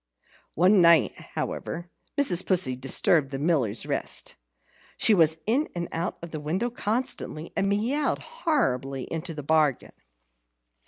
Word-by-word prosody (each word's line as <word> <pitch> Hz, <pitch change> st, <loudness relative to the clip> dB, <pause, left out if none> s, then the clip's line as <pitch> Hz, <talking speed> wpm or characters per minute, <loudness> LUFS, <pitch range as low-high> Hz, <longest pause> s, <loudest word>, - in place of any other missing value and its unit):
One 185 Hz, +4 st, +5 dB
night, 170 Hz, -1 st, +5 dB, 0.2 s
however, 175 Hz, +2 st, -4 dB, 0.3 s
Mrs. 190 Hz, -11 st, +3 dB
Pussy 170 Hz, -9 st, +1 dB
disturbed 135 Hz, +3 st, +2 dB
the 135 Hz, -, -4 dB
Miller's 135 Hz, -8 st, 0 dB
rest. -, -, -3 dB, 0.6 s
She 220 Hz, -, +5 dB
was 160 Hz, -4 st, +3 dB
in 255 Hz, +9 st, +1 dB
and 170 Hz, -1 st, -3 dB
out 165 Hz, +2 st, -3 dB
of 170 Hz, -, -7 dB
the 155 Hz, -, -5 dB
window 180 Hz, +11 st, -2 dB
constantly, 215 Hz, -8 st, -3 dB
and 195 Hz, 0 st, +1 dB
meowed 245 Hz, +9 st, 0 dB
horribly 180 Hz, -, -1 dB
into 165 Hz, 0 st, -4 dB
the 150 Hz, -, -6 dB
bargain. 150 Hz, -3 st, +1 dB
170 Hz, 130 wpm, -26 LUFS, 150-210 Hz, 0.6 s, One